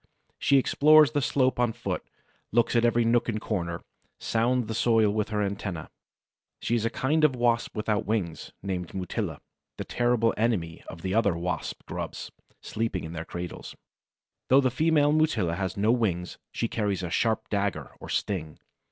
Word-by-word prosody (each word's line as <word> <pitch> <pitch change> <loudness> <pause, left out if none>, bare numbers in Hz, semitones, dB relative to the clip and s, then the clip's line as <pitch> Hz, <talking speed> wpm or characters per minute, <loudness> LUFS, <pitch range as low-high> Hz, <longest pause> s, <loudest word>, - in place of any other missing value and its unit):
She 140 - +4
explores 150 +2 +6
the 145 -2 0
slope 130 0 +1
on 120 -2 +2
foot, 100 -6 -4 0.5
looks 120 +2 +2
at 115 - +4
every 120 0 +3
nook 120 +1 +2
and 110 -1 -1
corner, 85 -6 -3 0.4
sounds 120 +2 +1
the 110 - -4
soil 110 -1 +3
with 105 0 -1
her 105 -2 0
antennæ. 95 -5 -5 0.7
She - - -2
is 115 -2 +1
a - - +2
kind 150 +6 0
of 145 -4 +4
Wasp 120 -1 +1
without 105 -1 -1
wings, 100 -7 -2
named 95 -2 -4
Mutilla, 90 -2 -3 0.4
the - - -3
terrible 120 -2 +1
enemy 100 -8 0
of 85 -2 -9
the 95 0 -1
other 100 -6 +2
Wasp 90 +1 -4
grubs - - -6 0.3
sleeping 110 -5 -2
in 80 - -6
their 80 0 -5
cradles. 85 0 -7 0.7
Though 135 +2 +6
the 130 -2 +1
female 150 +1 +3
Mutilla 150 - +2
has 95 0 -3
no 105 +3 +3
wings, 95 -8 -1
she 115 - -1
carries 105 -5 -1
a 85 - -4
sharp 110 +3 +1
dagger, 100 -1 -1
or - - -10
sting. 80 -6 -2
110 Hz, 170 wpm, -27 LUFS, 95-120 Hz, 0.7 s, explores